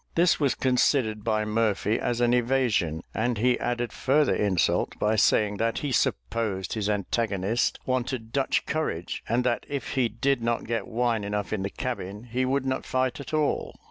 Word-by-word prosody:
This 170 Hz, 0 st, +4 dB
was 140 Hz, -4 st, +2 dB
considered 125 Hz, -4 st, +1 dB
by 110 Hz, -1 st, 0 dB
Murphy 105 Hz, 0 st, +1 dB
as 120 Hz, 0 st, -1 dB
an 120 Hz, 0 st, +3 dB
evasion; 120 Hz, -10 st, +1 dB
and 120 Hz, +2 st, 0 dB
he 125 Hz, +3 st, +2 dB
added 120 Hz, -1 st, -2 dB
further 145 Hz, +1 st, +2 dB
insult 95 Hz, -4 st, +1 dB
by 105 Hz, +1 st, +1 dB
saying 105 Hz, 0 st, +3 dB
that 115 Hz, +2 st, 0 dB
he 140 Hz, -, -1 dB
supposed 95 Hz, -, -1 dB
his 105 Hz, -2 st, -1 dB
antagonist 105 Hz, +1 st, 0 dB
wanted 125 Hz, -3 st, -2 dB
Dutch 135 Hz, -1 st, +1 dB
courage, 145 Hz, -, -3 dB
and 120 Hz, +3 st, +2 dB
that 120 Hz, -1 st, 0 dB
if 140 Hz, -2 st, -3 dB
he 130 Hz, -3 st, +1 dB
did 135 Hz, +3 st, 0 dB
not 115 Hz, 0 st, 0 dB
get 115 Hz, -3 st, -2 dB
wine 115 Hz, -2 st, 0 dB
enough 105 Hz, 0 st, -3 dB
in 105 Hz, -, -1 dB
the 100 Hz, -, -2 dB
cabin, 105 Hz, -4 st, -5 dB
he 125 Hz, +2 st, -1 dB
would 135 Hz, +1 st, 0 dB
not 130 Hz, 0 st, -1 dB
fight 130 Hz, +1 st, -1 dB
at 140 Hz, -, -8 dB
all. 155 Hz, -1 st, 0 dB
115 Hz, 175 wpm, -26 LUFS, 105-130 Hz, -, This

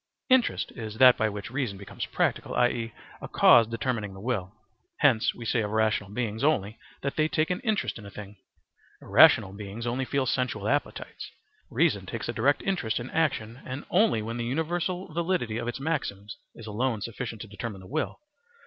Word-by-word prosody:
* -, -, -58 dB
Interest 240 Hz, -, -3 dB
is 110 Hz, -2 st, -7 dB
that 130 Hz, 0 st, +8 dB
by 110 Hz, -, +1 dB
which 105 Hz, +2 st, -7 dB
reason 125 Hz, -7 st, -2 dB
becomes 100 Hz, -, -6 dB
practical, -, -, -1 dB
i.e., 120 Hz, -2 st, +1 dB, 0.3 s
a -, -, -6 dB
cause 115 Hz, -2 st, +6 dB
determining 115 Hz, -3 st, -3 dB
the -, -, -10 dB
will. 100 Hz, -4 st, -2 dB, 0.5 s
Hence 125 Hz, -7 st, +3 dB
we 120 Hz, -, -8 dB
say 115 Hz, +1 st, +1 dB
of 105 Hz, -, -2 dB
rational 110 Hz, -2 st, +1 dB
beings 110 Hz, +1 st, -3 dB
only 110 Hz, -8 st, +1 dB, 0.2 s
that 140 Hz, -1 st, -3 dB
they 155 Hz, 0 st, +3 dB
take 155 Hz, +2 st, 0 dB
an 180 Hz, -, -1 dB
interest 215 Hz, -, -1 dB
in 105 Hz, -, -11 dB
a -, -, -8 dB
thing; 105 Hz, 0 st, -10 dB, 0.6 s
irrational 95 Hz, -, +6 dB
beings 105 Hz, +3 st, -7 dB
only 125 Hz, +2 st, -1 dB
feel 140 Hz, 0 st, 0 dB
sensual 125 Hz, -1 st, -1 dB
appetites. -, -, -2 dB, 0.4 s
Reason -, -, +1 dB
takes -, -, -4 dB
a -, -, -2 dB
direct 145 Hz, +1 st, +2 dB
interest 160 Hz, -, -1 dB
in 120 Hz, +2 st, -7 dB
action 125 Hz, -7 st, -1 dB
then 130 Hz, +3 st, -6 dB
only 185 Hz, -, +3 dB
when 115 Hz, +2 st, -4 dB
the 120 Hz, -, -2 dB
universal 170 Hz, +6 st, -2 dB
validity 170 Hz, -10 st, -1 dB
of 120 Hz, -, -4 dB
its 120 Hz, -, -3 dB
maxims 110 Hz, -9 st, -3 dB, 0.2 s
is 115 Hz, -, -10 dB
alone 110 Hz, +1 st, -1 dB
sufficient 115 Hz, +1 st, -5 dB
to 115 Hz, -, -7 dB
determine 100 Hz, 0 st, -6 dB
the -, -, -13 dB
will. 155 Hz, +11 st, -3 dB
120 Hz, 190 wpm, -27 LUFS, 105-140 Hz, 0.6 s, that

